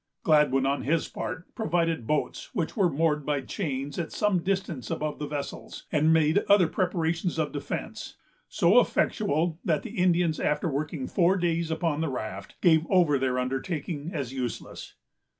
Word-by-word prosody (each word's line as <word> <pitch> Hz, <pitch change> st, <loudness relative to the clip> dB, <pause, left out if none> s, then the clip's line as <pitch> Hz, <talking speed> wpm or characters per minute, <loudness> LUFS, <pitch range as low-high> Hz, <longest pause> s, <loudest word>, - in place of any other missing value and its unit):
Gladwyn, 150 Hz, -4 st, +4 dB
on 140 Hz, +1 st, 0 dB
his 160 Hz, +3 st, 0 dB
part, 165 Hz, -, -6 dB
provided 165 Hz, -, 0 dB
boats 150 Hz, -1 st, -1 dB
which 165 Hz, -, -2 dB
were 195 Hz, -6 st, +3 dB
moored 150 Hz, 0 st, +1 dB
by 145 Hz, -1 st, -1 dB
chains 140 Hz, -1 st, -4 dB
at 170 Hz, -, -3 dB
some 205 Hz, -3 st, +1 dB
distance 180 Hz, -, -2 dB
above 150 Hz, 0 st, -3 dB
the 150 Hz, -, -3 dB
vessels, 145 Hz, -1 st, -6 dB
and 155 Hz, +1 st, +3 dB
made 160 Hz, +2 st, +4 dB
other 200 Hz, -4 st, +6 dB
preparations 170 Hz, -1 st, -1 dB
of 155 Hz, -2 st, 0 dB
defence, 145 Hz, -1 st, -5 dB, 0.3 s
so -, -, +5 dB
effectual 160 Hz, +3 st, 0 dB
that 160 Hz, -7 st, 0 dB
the -, -, -7 dB
Indians, 175 Hz, -3 st, +2 dB
after 150 Hz, +3 st, 0 dB
working 150 Hz, -1 st, -3 dB
four 185 Hz, +5 st, +2 dB
days 170 Hz, -2 st, 0 dB
upon 160 Hz, -2 st, -1 dB
the 160 Hz, -, 0 dB
raft, 110 Hz, -6 st, -6 dB
gave 165 Hz, -2 st, +4 dB
over 170 Hz, -7 st, +4 dB
their 130 Hz, -1 st, 0 dB
undertaking 145 Hz, +4 st, -3 dB
as 140 Hz, -7 st, -4 dB
useless. 125 Hz, -3 st, -5 dB
155 Hz, 160 wpm, -27 LUFS, 145-170 Hz, 0.3 s, other